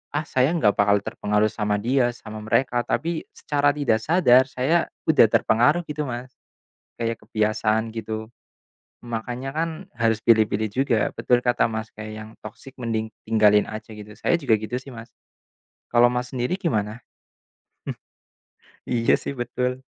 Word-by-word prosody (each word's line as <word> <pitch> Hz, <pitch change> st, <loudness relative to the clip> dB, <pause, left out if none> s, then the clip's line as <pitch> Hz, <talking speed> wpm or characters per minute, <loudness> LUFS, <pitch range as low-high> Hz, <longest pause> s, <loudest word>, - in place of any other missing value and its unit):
"Ah 150 Hz, -, 0 dB
saya 130 Hz, +3 st, +2 dB
nggak 105 Hz, -11 st, +3 dB
bakal 105 Hz, 0 st, +4 dB
terpengaruh 105 Hz, +1 st, 0 dB
sama 105 Hz, -2 st, -1 dB
dia, 120 Hz, +2 st, +2 dB
sama 110 Hz, -2 st, -9 dB
mereka," 120 Hz, +2 st, +1 dB
tapi 165 Hz, +1 st, -1 dB
secara 145 Hz, -1 st, +1 dB
tidak 130 Hz, -7 st, +1 dB
sadar 150 Hz, -7 st, +5 dB
saya 140 Hz, +6 st, +1 dB, 0.2 s
udah 150 Hz, -7 st, +6 dB
terpengaruh 125 Hz, +10 st, +3 dB
gitu 150 Hz, 0 st, -3 dB
Mas, 125 Hz, +1 st, -6 dB, 0.7 s
kayak 115 Hz, 0 st, -1 dB
kebiasaan 110 Hz, +1 st, 0 dB
gitu. 110 Hz, -1 st, -5 dB, 0.8 s
Makanya 120 Hz, +3 st, -4 dB
kan 165 Hz, +1 st, 0 dB, 0.3 s
harus 115 Hz, -1 st, +2 dB
pilih-pilih 110 Hz, -1 st, +3 dB
juga, 130 Hz, -3 st, +1 dB, 0.2 s
betul 125 Hz, -, +2 dB
kata 120 Hz, -1 st, +3 dB
Mas 110 Hz, 0 st, -5 dB
kayak 110 Hz, 0 st, -7 dB
yang -, -, -12 dB
toksik 115 Hz, +5 st, -10 dB
mending 110 Hz, -1 st, -2 dB, 0.2 s
tinggalin 105 Hz, -2 st, +4 dB
aja 110 Hz, 0 st, -8 dB
gitu, 105 Hz, 0 st, -10 dB
saya -, -, +2 dB
juga 135 Hz, -8 st, +3 dB
gitu 110 Hz, +3 st, -5 dB
sih 135 Hz, -, -12 dB
Mas. 115 Hz, 0 st, -10 dB, 0.8 s
Kalau 120 Hz, 0 st, +6 dB
Mas 125 Hz, 0 st, -3 dB
sendiri 125 Hz, +7 st, 0 dB
gimana? 110 Hz, -, -1 dB, 1.9 s
Hmm. -, -, -2 dB
Iya -, -, +5 dB
sih -, -, -4 dB
betul. 125 Hz, +1 st, -2 dB
115 Hz, 145 wpm, -23 LUFS, 110-130 Hz, 1.9 s, udah